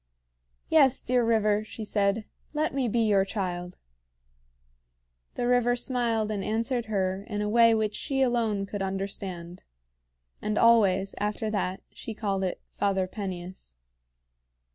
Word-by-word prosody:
"Yes, 275 -5 +5
dear 250 0 +1
river," 215 -2 +2
she 220 +1 -8
said, 205 +1 +1 0.3
"let 305 -1 0
me 265 -2 0
be 230 +1 +1
your 205 -3 +4
child." 180 -3 -4 1.6
The 240 - -1
river 245 0 +3
smiled 235 -3 0
and 200 -2 -2
answered 230 +3 -1
her 190 -2 -1
in 210 -1 -2
a - - -1
way 230 +1 +5
which 215 -1 0
she 270 -2 0
alone 225 -5 +1
could 200 0 -5
understand; 190 -2 -5 0.8
and 210 0 -1
always, 195 -5 +4
after 210 +1 -2
that, 190 -3 -2
she 225 - -8
called 195 -3 -1
it 185 - -2
"Father 195 -2 0
Peneus." 185 - -7
210 Hz, 135 wpm, -27 LUFS, 195-230 Hz, 1.6 s, Yes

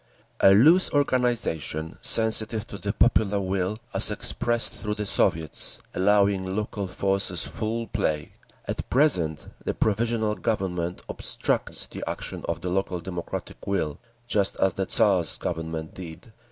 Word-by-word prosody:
"A 95 - +7
loose 160 - +6
organisation, 120 - 0
sensitive 110 -1 +1
to 100 - -9
the 100 - -2
popular 105 -3 +3
will 95 +1 -1 0.2
as - - +7
expressed 120 +2 0
through 105 -1 -4
the 105 0 -3
Soviets, 80 -4 0 0.2
allowing 100 -1 +2
local 105 -2 -3
forces 95 -1 0
full 115 +1 -3
play. 80 -10 -2 0.4
At - - -4
present 90 - +2 0.2
the - - -2
Provisional 110 0 +1
Government 90 -6 -2
obstructs - - 0
the - - -8
action - - -5
of - - -2
the 90 - -3
local 95 -1 -1
democratic 85 0 -6
will, 80 -7 -1 0.3
just 105 -4 +2
as 95 -2 +2
the 95 -1 -2
Tsar's 95 -6 +3
Government 80 -1 -4
did. 90 +5 -10
100 Hz, 135 wpm, -26 LUFS, 90-110 Hz, 0.4 s, A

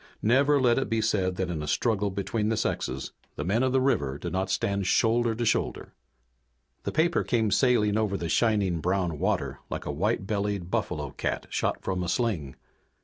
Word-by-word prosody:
Never 140 +6 +4
let 125 -1 +3
it 135 - -2
be 115 -1 +1
said 95 -4 +1
that 90 -1 -2
in 80 -3 -3
a 75 - -5
struggle 105 +4 +1
between 100 +3 -2
the 110 - 0
sexes - - -2 0.2
the 70 - -3
men 105 +7 +1
of 130 0 +2
the 130 - +3
river 70 - +1
did 85 +2 -5
not 95 +1 -1
stand 100 0 0
shoulder 115 +2 +2
to 120 +1 -2
shoulder. - - -1 0.9
The - - -1
paper 170 +2 +2
came 110 -4 +1
sailing 115 -5 +3
over 105 -3 0
the 85 - -3
shining 100 -3 +2
brown 90 -3 -1
water - - -1
like - - -4
a - - -2
white - - 0
bellied 100 -3 -2
buffalo 75 -6 -2
cat - - -3
shot - - -1
from 95 -1 -1
a 90 - -2
sling. 90 - -1
100 Hz, 195 wpm, -27 LUFS, 90-115 Hz, 0.9 s, Never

